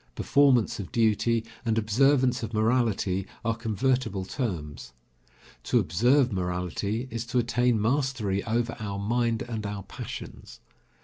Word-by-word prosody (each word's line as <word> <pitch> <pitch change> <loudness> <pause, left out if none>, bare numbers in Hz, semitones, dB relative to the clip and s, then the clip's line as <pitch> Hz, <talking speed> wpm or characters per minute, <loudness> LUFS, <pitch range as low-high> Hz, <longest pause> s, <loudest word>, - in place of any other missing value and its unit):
Performance 135 -7 +3
of 95 - -6
duty 115 0 +2 0.2
and 115 -2 0
observance 125 +3 +3
of 115 -1 -5
morality 110 -4 +1 0.2
are 115 - +2
convertible 115 -2 -1
terms. 80 - -5 0.7
To - - +2
observe 120 - +3
morality 90 +6 -2
is 115 0 -3
to 125 - -1
attain 120 -1 +2
mastery 115 -5 0
over 120 +1 -1
our 100 -2 -4
mind 115 +2 0
and 115 -3 -5
our 100 -1 -4
passions. - - -9
115 Hz, 125 wpm, -27 LUFS, 100-125 Hz, 0.7 s, Performance